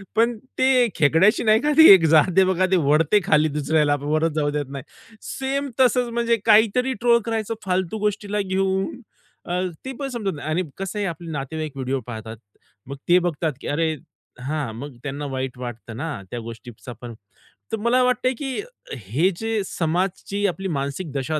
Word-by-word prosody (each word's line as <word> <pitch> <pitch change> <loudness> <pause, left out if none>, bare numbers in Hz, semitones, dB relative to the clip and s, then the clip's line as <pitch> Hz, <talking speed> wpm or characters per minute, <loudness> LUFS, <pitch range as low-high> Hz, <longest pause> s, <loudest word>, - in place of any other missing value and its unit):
पण 230 +1 +2 0.2
ते 260 -2 +4
खेकड्याशी 165 +9 +4
नाही 220 +1 +4
का 300 +1 +1
ते 320 - +10
एक 170 -4 +5
जात 155 +4 +6
आहे 190 - +8
बघा 185 0 +2
ते - - +5
ओढते 160 +7 +4
खाली 155 +1 +3
दुसऱ्याला 150 0 +2
वरच 155 +3 0
जाऊ 145 -1 +1
देत 145 0 -2
नाही. 135 -2 -7 0.4
सेम 275 +1 -3
तसंच 250 -1 +3
म्हणजे 235 0 +1
काहीतरी 225 +4 +4
ट्रोल 235 -1 +5
करायचं 225 -1 -2
फालतू 185 +2 -1
गोष्टीला 210 0 -1
घेऊन, 190 +4 -1 0.4
अ, 180 +1 -1 0.2
ते 265 - -4
पण 275 - -2
समजत 210 -8 -3
नाही 150 +2 -6
आणि 175 +4 0
कसं 195 +2 -5
आहे 200 - -1
आपले 170 -1 -6
नातेवाईक 150 +2 -4
व्हिडिओ 135 0 -2
पाहतात. 110 -1 -7 0.5
मग 140 - -5
ते 180 - +7
बघतात 165 -3 -1
की - - -7
अरे! 160 +1 0 0.5
हां, 140 -4 -3
मग 135 +2 -8
त्यांना 145 +1 -4
वाईट 130 -2 -4
वाटतं 120 -2 -7
ना 145 -7 -4
त्या 120 - -4
गोष्टीचा 115 +1 -9
पण. 120 -1 -7 0.6
तर 225 - -1
मला 235 +3 +2
वाटतंय 250 +1 +1
की 270 +6 -3 0.4
हे 125 - 0
जे 225 -1 -1
समाजची 185 +4 -2
आपली 190 +1 -3
मानसिक 140 +4 -4
दशा 145 +3 -2
175 Hz, 175 wpm, -22 LUFS, 145-220 Hz, 0.6 s, ते